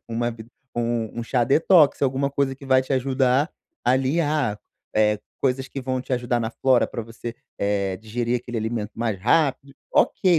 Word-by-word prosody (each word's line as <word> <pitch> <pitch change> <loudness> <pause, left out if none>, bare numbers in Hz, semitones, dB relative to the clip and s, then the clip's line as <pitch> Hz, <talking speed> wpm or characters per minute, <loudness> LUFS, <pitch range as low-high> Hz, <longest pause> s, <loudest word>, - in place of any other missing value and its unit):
uma 120 +1 -1
b 115 -1 -9 0.3
um 120 -1 -1
um - - -3
chá 125 0 +1
detox, 155 +2 +5
alguma 135 +1 +1
coisa 140 -1 0
que 135 +1 -14
vai 130 -1 +5
te 135 - -4
ajudar, 130 +2 +2 0.3
ali 130 +6 +2
ah, 145 -9 0 0.4
eh, 105 -1 +3 0.2
coisas 135 0 +1
que 135 - -5
vão 130 0 -2
te 130 - -7
ajudar 120 -1 0
na 110 - -2
flora 130 +1 +3
pra - - -5
você, 115 +1 -7 0.2
eh, 100 -2 0
digerir 120 +3 -2
aquele 120 0 -7
alimento 110 -1 -3
mais 115 -4 -2
rápido. 140 - +1 0.2
Ok, 180 -4 +4
125 Hz, 180 wpm, -24 LUFS, 115-135 Hz, 0.4 s, detox